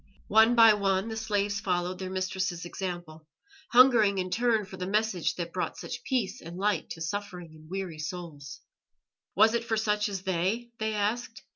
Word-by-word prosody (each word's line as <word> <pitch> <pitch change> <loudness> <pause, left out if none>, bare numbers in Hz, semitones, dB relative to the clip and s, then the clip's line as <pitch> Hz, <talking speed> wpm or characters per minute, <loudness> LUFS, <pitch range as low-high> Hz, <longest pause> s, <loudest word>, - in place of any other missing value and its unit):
One 220 +2 +6
by 225 -2 +8
one 195 0 0
the 220 - -4
slaves 205 -2 -1
followed 180 -1 -1
their 185 -1 -4
mistress's 185 -2 -2
example, 175 -4 -6 0.4
hungering 240 -6 +6
in 185 -1 -2
their - - -1
turn 230 -4 +2
for 190 - -10
the 180 0 -4
message 210 -3 0
that 170 -1 -5
brought - - -3
such - - -6
peace 240 -4 -1
and 170 +2 -9
light 200 -4 0
to 165 - -12
suffering 180 -1 -5
and 155 0 -16
weary 185 -4 -5
souls. 155 -4 -7 0.7
Was 220 +4 +5
it 235 0 0
for 225 -1 -1
such 210 -1 +1
as 195 -2 -5
they? 190 +6 -1
they 220 0 -1
asked. 225 +3 -2
195 Hz, 180 wpm, -28 LUFS, 180-220 Hz, 0.7 s, by